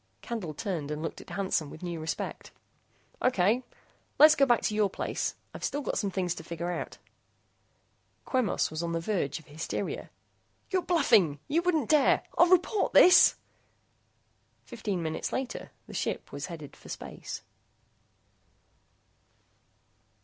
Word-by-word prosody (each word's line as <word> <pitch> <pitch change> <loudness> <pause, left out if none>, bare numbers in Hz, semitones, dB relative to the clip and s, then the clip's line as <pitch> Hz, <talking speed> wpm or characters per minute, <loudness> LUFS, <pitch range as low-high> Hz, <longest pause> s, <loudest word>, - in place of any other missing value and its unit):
Candle 200 -11 -4
turned 170 -8 -3
and 150 +1 -4
looked 165 - -5
at - - -15
Hansen 185 -6 -1
with 160 - -11
new 170 -2 -4
respect. 160 +1 -4 0.7
"Okay... 225 0 +3 0.6
Let's 305 +1 +9
go 275 -2 +3
back 240 -2 +3
to - - 0
your 210 -1 +2
place. - - -3 0.2
I've - - -9
still 290 - -1
got - - -1
some 200 - -1
things 180 -2 -1
to 160 - -9
figure 170 +1 -4
out." - - -5 1.3
Quemos 255 - +1
was 155 +1 -3
on 170 0 -2
the 165 - 0
verge 165 -6 -1
of 160 - -13
hysteria. 150 +3 -4 0.6
"You're 375 -1 +2
bluffing! 220 - +3
You 320 +4 +2
wouldn't 325 -8 +1
dare. 305 -2 +4
I'll 345 +1 +6
report 370 +3 +2
this!" 360 - +8 1.3
Fifteen 205 -6 -3
minutes 160 0 -3
later, 260 -1 -4 0.2
the - - -12
ship - - -3
headed 150 0 -7
for - - -15
space. - - -7
195 Hz, 140 wpm, -29 LUFS, 165-260 Hz, 1.3 s, Let's